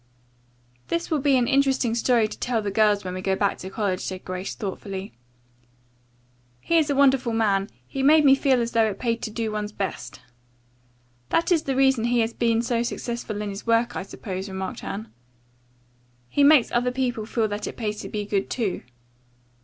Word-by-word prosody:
"That 335 +1 -2
will 310 - +2
be 275 -1 +3
an 245 -1 +1
interesting 270 -3 +2
story 235 -1 +2
to - - -10
tell 245 -2 0
the 200 - -2
girls 210 0 +3
when 180 - -4
we 185 - -4
go 190 0 0
back 200 0 0
to 190 - -7
college," 195 -3 -1
said 185 -1 -6
Grace 185 +1 -5
thoughtfully. 195 -1 -6 1.5
"He 335 - +2
is 310 -2 0
a 285 - +1
wonderful 265 -3 +3
man, 205 -3 +1 0.2
he 270 - -4
made 300 +2 +5
me 270 - +8
feel 270 -2 +3
as 230 - -4
though 225 -1 +3
it 200 - -5
paid 230 -2 -1
to - - -3
do 220 0 -3
one's 210 0 -3
best." 190 -11 -5 1.1
"That 335 +3 +1
is 335 -3 +4
the 270 - -1
reason 265 -3 +3
he 240 0 +2
has 225 +1 -1
been 230 -1 +1
so 235 -1 0
successful 235 -3 -4
in 205 - -4
his 200 +3 -8
work, 230 +1 +2
I - - -2
suppose," 190 0 -6
remarked 190 0 -5
Anne. 215 +3 -5 1.2
"He 285 - +2
makes 285 -4 +6
other 245 +1 +1
people 245 -4 -2
feel 225 -1 0
that 205 +1 -4
it - - -7
pays 210 -3 -3
to - - -7
be 210 -1 -3
good, 200 -1 -1
too." 220 -7 -2
230 Hz, 195 wpm, -24 LUFS, 205-255 Hz, 1.5 s, me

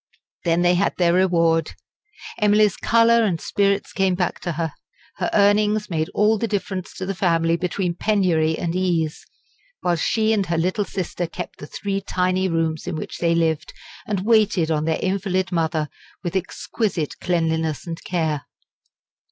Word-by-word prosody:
Then 170 +1 +2
they 175 0 +4
had 180 +3 +1
their 170 -2 +3
reward. 165 -3 +2 0.7
Emily's 210 -1 +4
colour 230 0 +4
and 180 -6 0
spirits 200 +1 0
came 190 -2 +2
back; 180 -1 -2
her 165 -2 -2 0.6
earnings 210 0 +3
made 160 +1 -1
all 210 +1 +3
the 230 - 0
difference 195 -3 -3
to 185 - -4
the 195 - -2
family 165 -3 +2
between 180 0 -1
penury 175 -5 +1
and 170 -2 -2
ease; 170 -4 0 0.6
while 175 -1 +1
she 220 +6 +1
and 200 -4 0
her 170 0 0
little 185 +5 0
sister 180 -3 -3
kept 180 +1 -7
the 145 - -8
three 195 +3 -3
tiny 185 0 0
rooms 165 -2 -1
in - - -2
which 155 - -6
they 170 -1 +2
lived, 160 -2 0 0.3
and 200 -2 -2
waited 210 -7 +3
on 155 -1 0
their 160 0 +1
invalid 190 0 0
mother, 160 -3 0 0.4
with 175 0 -3
exquisite 190 -2 -2
cleanliness 160 -3 -1
and 165 -1 -6
care. 160 -5 -2
180 Hz, 155 wpm, -22 LUFS, 165-200 Hz, 0.7 s, they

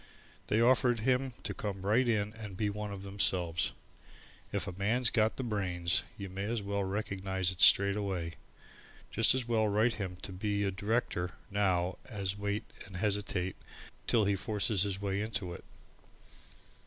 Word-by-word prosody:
They 110 - +2
offered 120 -1 +4
him 130 +2 +1
to 105 - -2
come 100 -1 -4
right 120 +5 +3
in 105 -2 0
and 105 -5 -8
be 105 -1 0
one 105 0 -5
of 100 -1 -7
themselves. 90 -5 +2 0.8
If - - -2
a 95 - -4
man's 110 +6 +2
got 110 -1 +2
the 130 - -2
brains, 90 -6 0 0.2
you 100 -2 -5
may 95 +2 -4
as 115 +2 -1
well 100 0 -1
recognize 95 -2 -1
it 90 - -3
straight 100 0 +7
away. 95 -5 -2 0.8
Just 115 +3 +5
as 125 -2 0
well 110 -2 +2
write 110 +3 +2
him 95 -2 -4
to - - -4
be 100 +2 -1
a 100 - +1
director 95 -3 -1 0.2
now 95 -3 +1
as 100 -5 -2
wait 100 +1 -2 0.2
and 95 -2 -8
hesitate 100 -2 -1 0.5
till 110 -3 +4
he 100 0 +2
forces 105 0 0
his 100 -1 0
way 100 0 -1
into 105 -5 -3
it. - - -10
100 Hz, 165 wpm, -32 LUFS, 95-110 Hz, 0.8 s, straight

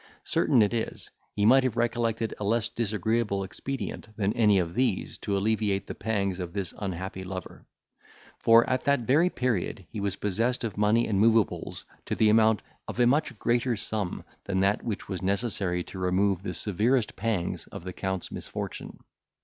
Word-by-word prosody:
Certain 115 - +3
it 105 - 0
is, 115 -1 -3 0.2
he 105 - +2
might 130 +4 +7
have 125 -3 -1
recollected 115 -1 0
a - - -3
less 115 +2 +1
disagreeable 110 -1 0
expedient 105 +3 -5
than 100 -1 +1
any 105 -3 +4
of 85 -2 0
these 120 -4 0
to 100 - -1
alleviate 105 -1 0
the - - -6
pangs 100 -3 -1
of 90 -2 -5
this 100 -3 -3
unhappy 95 -1 -4
lover; 95 0 -8 0.7
for, 115 0 +6
at 130 0 0
that 140 -2 +3
very 145 +9 +3
period 115 - -2
he 110 - -5
was 100 -1 -1
possessed 115 +7 0
of 110 -5 -3
money 105 +3 +3
and 100 -3 +1
moveables 110 -3 +2 0.2
to - - -1
the 110 - +4
amount 110 -1 +4 0.2
of - - -6
a 120 - +6
much 140 -1 +2
greater 120 +2 +1
sum 105 -3 -3 0.2
than 95 -1 0
that 100 +2 +2
which 110 -4 -4
was 95 -3 -4
necessary 95 -3 0
to 95 - -9
remove 95 +1 +1
the 90 -3 -4
severest 110 +4 +1
pangs 100 -5 -2
of - - -9
the 90 0 -6
Count's 95 -1 -3
misfortune. - - -6
105 Hz, 175 wpm, -27 LUFS, 95-115 Hz, 0.7 s, might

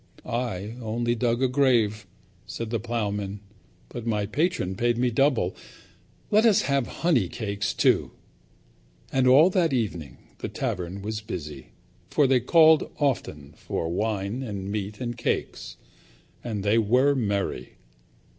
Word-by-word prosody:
"I 115 -2 -3
only 120 +1 -1
dug 120 +1 0
a - - +4
grave," 120 -6 +2 0.4
said 115 -1 -5
the 115 - 0
ploughman, 105 -3 -3 0.5
"but 120 - -7
my 105 -2 0
patron 125 - -1
paid 120 +4 0
me 125 0 +1
double. 125 -7 +1 0.8
Let 215 +1 +5
us 225 -4 +4
have 140 -3 0 0.2
honey 130 - +3
cakes 100 -2 -3
too." - - +2 1.0
And 130 -1 +2
all 145 +8 +7
that 175 -6 +2
evening 90 - -3 0.2
the - - -4
tavern 90 +2 -4
was 110 +1 -4
busy, 75 - -7 0.4
for 145 - +3
they 130 -1 +4
called 160 +4 +5
often 75 - -2
for 80 - -4
wine 105 +4 -2
and 100 -5 -5
meat 105 0 -4
and 120 -2 -3
cakes. 120 - -3 0.7
And 105 -5 -4
they 105 +3 +3
were 125 +6 +3
merry. 100 -7 -2
115 Hz, 135 wpm, -25 LUFS, 100-130 Hz, 1.0 s, all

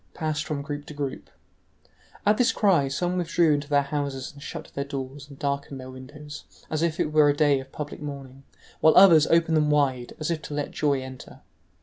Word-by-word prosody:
passed 155 -1 -2
from 150 -3 -3
group 145 0 -6
to 150 - -9
group. 140 -2 -5 1.0
At 210 +1 +4
this 250 0 +3
cry 180 -10 +3
some 175 +7 -1
withdrew 170 -2 +2
into 145 0 -2
their 145 -1 +3
houses 140 0 -4
and 140 - -14
shut - - -8
their 140 - -2
doors 140 +1 -7
and 140 - -12
darkened 140 -1 -3
their 130 0 -9
windows, 145 +3 -10 0.3
as 155 0 -1
if 165 -1 0
it 150 - 0
were 150 -1 +6
a 145 - +2
day 145 -3 +3
of 135 0 -11
public 150 0 -7
mourning, 135 -2 -8 0.4
while 160 -1 +5
others 170 -5 +8
opened 165 -1 +3
them 150 -1 +2
wide, 135 -4 +1
as 155 +2 -2
if 160 -2 -2
to 150 - -7
let 145 -1 -3
joy 140 -3 0
enter. 130 -1 -11
145 Hz, 210 wpm, -25 LUFS, 140-155 Hz, 1.0 s, others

